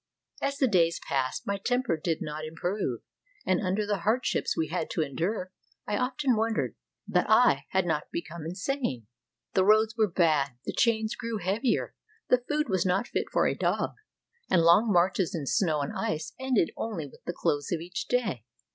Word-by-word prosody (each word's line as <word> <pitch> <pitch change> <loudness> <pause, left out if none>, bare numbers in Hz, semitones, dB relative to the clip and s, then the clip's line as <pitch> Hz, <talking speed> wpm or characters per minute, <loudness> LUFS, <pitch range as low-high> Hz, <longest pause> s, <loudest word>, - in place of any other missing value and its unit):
As 275 0 -1
the 270 - +3
days 170 -6 +3
passed, 135 -3 -1
my 200 0 -1
temper 245 -1 0
did 160 +1 -2
not 150 +1 -5
improve; 165 - -3 0.4
and 185 -1 +2
under 195 +2 0
the 205 -1 -1
hardships 220 +9 0
we 160 - 0
had 175 +2 -2
to 160 - 0
endure, 180 - -2 0.3
I 210 - -1
often 255 +2 +1
wondered 225 +1 0 0.3
that - - +1
I - - +5
had 190 -1 +1
not 155 -3 -1
become 170 -1 -5
insane. 180 - -3 0.5
The 190 - +4
roads 215 +3 +4
were 220 -3 +2
bad, 155 -7 +2
the - - -3
chains 220 -2 +2
grew 230 -1 -3
heavier, 205 +7 0 0.4
the 250 -1 +4
food 300 0 +1
was 185 -5 +1
not 190 +6 0
fit - - -1
for - - +2
a - - +2
dog, - - 0 0.6
and 170 -3 +4
long 190 +7 +5
marches 180 -1 +2
in 155 -4 -3
snow 155 0 +1
and 140 - -3
ice 160 0 -2
ended 260 -10 +1
only 205 -9 -3
with 140 - -15
the 175 - -3
close 145 -4 -1
of 170 - 0
each 175 +3 -5
day. 200 - 0
185 Hz, 180 wpm, -28 LUFS, 165-220 Hz, 0.6 s, I